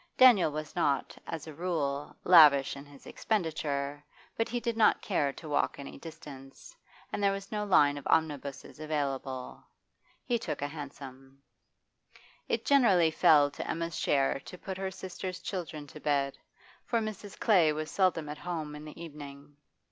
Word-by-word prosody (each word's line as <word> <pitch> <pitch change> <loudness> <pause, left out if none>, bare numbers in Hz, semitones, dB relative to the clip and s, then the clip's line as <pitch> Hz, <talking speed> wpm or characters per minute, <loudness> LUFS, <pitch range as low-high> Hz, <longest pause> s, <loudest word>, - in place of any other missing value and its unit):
Daniel 240 -11 +7
was 155 0 -6
not, 140 -2 0
as 160 -2 -5
a 155 - -8
rule, 145 -4 -2
lavish 150 -7 +7
in 140 +1 -10
his 145 -1 -16
expenditure, 145 -7 -2 0.3
but 225 - -1
he 240 - -1
did 235 -1 -2
not 225 -1 +4
care 145 -8 0
to 155 - -11
walk 145 - 0
any 140 - -8
distance, 150 -5 -11 0.4
and - - -2
there 200 -1 +4
was 195 0 -6
no 210 -1 -1
line 145 -8 +4
of - - -8
omnibuses 145 -3 -1
available. 135 -4 -3 0.6
He 240 -2 +1
took 220 - -4
a - - 0
hansom. 135 -2 -10 1.1
It - - -1
generally 195 - +5
fell 155 -3 +5
to - - -6
Emma's 165 0 -2
share 135 -1 +1
to 180 - -11
put 190 +1 -6
her 190 0 -2
sister's 185 0 -6
children 165 -6 -5
to 145 - -12
bed, 140 -2 0 0.5
for 235 - -1
Mrs. 215 -2 -6
Clay 180 -9 +4
was 155 +1 -4
seldom 180 -5 +1
at 150 0 -6
home 160 -4 -4
in 150 +1 -9
the 155 +1 -11
evening. 145 -3 -10
155 Hz, 165 wpm, -30 LUFS, 140-185 Hz, 1.1 s, Daniel